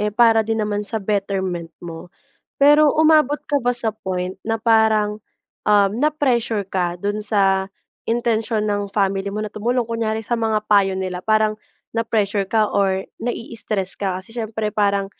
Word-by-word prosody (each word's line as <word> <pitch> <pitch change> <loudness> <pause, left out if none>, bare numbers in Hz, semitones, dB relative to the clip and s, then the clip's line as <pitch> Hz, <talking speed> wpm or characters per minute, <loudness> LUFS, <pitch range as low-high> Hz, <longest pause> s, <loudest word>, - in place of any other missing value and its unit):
eh, 210 0 0
para 225 0 +4
din 225 +1 -2
naman 205 0 -2
sa 220 +2 -2
betterment 190 -4 -2
mo. 170 +1 -8 0.5
Pero 295 +1 +6
umabot 310 -2 +4
ka 285 -2 +1
ba 245 - +2
sa 230 -2 0
point 185 -3 -4
na 225 0 -1
parang, 220 -2 +2 0.5
um, 205 -2 +5
na-pressure 245 -6 0
ka 180 -2 -2
doon 205 +2 -2
sa 195 -2 +2 0.4
intensyon 225 -2 0
ng 205 -1 -1
family 195 -1 0
mo 210 +2 -3
na 210 - -7
tumulong, 240 +3 0
kunyari 225 -1 -2
sa 240 - 0
mga 220 -2 0
payo 195 -2 +3
nila? 185 -1 -3
Parang 215 0 +2 0.4
na-pressure 210 -3 0
ka 220 -1 +3
or 190 -1 +1 0.2
nai-istress 220 -5 -3
ka, 190 -2 -2
kasi 185 +4 -12
siyempre 220 -2 -3
parang 200 -1 +1
215 Hz, 160 wpm, -21 LUFS, 195-225 Hz, 0.5 s, Pero